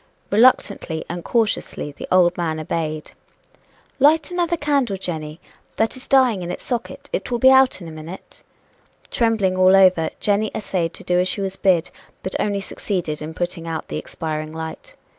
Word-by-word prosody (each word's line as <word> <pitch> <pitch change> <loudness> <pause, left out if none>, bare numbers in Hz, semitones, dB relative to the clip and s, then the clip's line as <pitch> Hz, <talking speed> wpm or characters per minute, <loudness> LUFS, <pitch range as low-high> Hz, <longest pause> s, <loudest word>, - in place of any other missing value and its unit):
Reluctantly 200 -7 +3
and 175 0 -5
cautiously 220 -9 -1
the 145 - -9
old 180 -1 +4
man 160 -2 -2
obeyed. 155 -1 -3 0.9
"Light 300 +3 +4
another 345 -1 0
candle, 280 -9 0
Jenny 160 -4 -5 0.4
that 225 +3 0
is 260 - -11
dying 255 -7 +4
in 175 - -5
its - - -5
socket 245 -2 -4
it - - -2
will 240 - 0
be 260 +3 +6
out 265 -5 +5
in - - -8
a - - -8
minute." 160 +4 -10 0.7
Trembling 220 -5 +1
all 185 +1 +6
over, 185 -4 +5
Jenny 210 +1 +1
essayed 180 -5 -2
to - - -9
do 180 -1 +1
as 180 - +2
she 200 - -2
was 195 -1 -3
bid, 185 -4 +2 0.3
but 190 - -4
only 200 -1 0
succeeded 175 -7 -3
in 155 +1 -6
putting 175 -1 -3
out 165 -1 -4
the - - -3
expiring 155 -1 -5
light. 160 - -8
185 Hz, 175 wpm, -21 LUFS, 165-230 Hz, 0.9 s, be